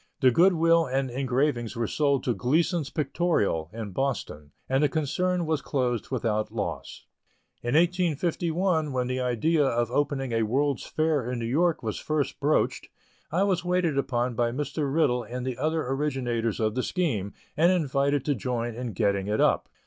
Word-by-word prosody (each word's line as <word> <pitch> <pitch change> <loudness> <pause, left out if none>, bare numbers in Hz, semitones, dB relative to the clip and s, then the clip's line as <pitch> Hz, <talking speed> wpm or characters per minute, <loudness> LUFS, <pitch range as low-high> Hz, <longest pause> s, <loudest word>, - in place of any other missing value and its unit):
The 130 -2 +6
good 180 +8 +5
will 165 0 +3
and 135 +1 -1
the 125 - -4
engravings 130 -2 0
were 115 0 -1
sold 140 +2 +1
to 125 - +1
Gleasons 150 - +1
Pictorial, 145 - 0
in 110 -2 -6
Boston, 95 - -3 0.2
and 135 +1 +1
the 150 - +4
concern 175 +4 0
was 155 -2 0
closed 125 -4 -1
without 110 -4 -1
loss. - - -5 0.6
In 120 +3 -1
1851, 170 -1 +1
when 125 -1 0
the 125 +1 -2
idea 130 +6 +1
of 120 -3 0
opening 135 -2 0
a 115 0 +1
World's 135 +5 0
Fair 155 -6 0
in 125 - -2
New 115 - -3
York 160 +7 +1
was 110 -2 -3
first 155 -2 -2
broached, 150 +2 +1 0.4
I 180 +5 +2
was 185 -3 +1
waited 180 -4 +1
upon 125 -2 -1
by 120 +1 +1
Mr. 145 +2 -2
Riddell 140 -5 +2
and 125 +2 -6
the 130 -2 -4
other 155 0 0
originators 130 -5 -1
of 110 -1 +1
the 130 - -1
scheme, 120 - -2 0.2
and 170 +4 +4
invited 140 -5 +1
to 145 - +2
join 120 -1 -2
in 120 -1 -5
getting 100 0 0
it 105 +1 0
up. - - +2
135 Hz, 175 wpm, -27 LUFS, 120-160 Hz, 0.6 s, The